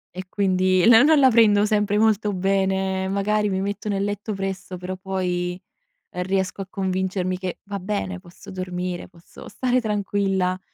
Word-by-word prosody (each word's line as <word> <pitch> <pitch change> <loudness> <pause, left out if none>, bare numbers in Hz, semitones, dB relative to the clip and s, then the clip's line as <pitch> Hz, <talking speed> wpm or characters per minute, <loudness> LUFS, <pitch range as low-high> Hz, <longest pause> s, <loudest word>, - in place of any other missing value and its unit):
E 185 0 -6
quindi 185 -1 +2
no 230 -1 +8
non 310 +2 +5
la 265 -2 +6
prendo 210 -3 +5
sempre 210 -1 +1
molto 215 -1 +2
bene, 190 0 0
magari 210 +2 0
mi 190 -1 -1
metto 205 +1 -3
nel 200 -1 0
letto 205 +1 -3
presto 195 -1 -5
però 180 +1 -5
poi, 180 -2 -3 0.5
uhm, 180 - -2
riesco 190 +1 -1
a 195 - -6
convincermi 185 -1 -2
che: 185 -1 -5
"Va 200 0 -4
bene, 195 -1 -3
posso 175 -1 -15
dormire, 180 -1 -4
posso 170 0 -15
stare 255 -1 0
tranquilla". 195 -3 0
195 Hz, 160 wpm, -23 LUFS, 185-205 Hz, 0.5 s, no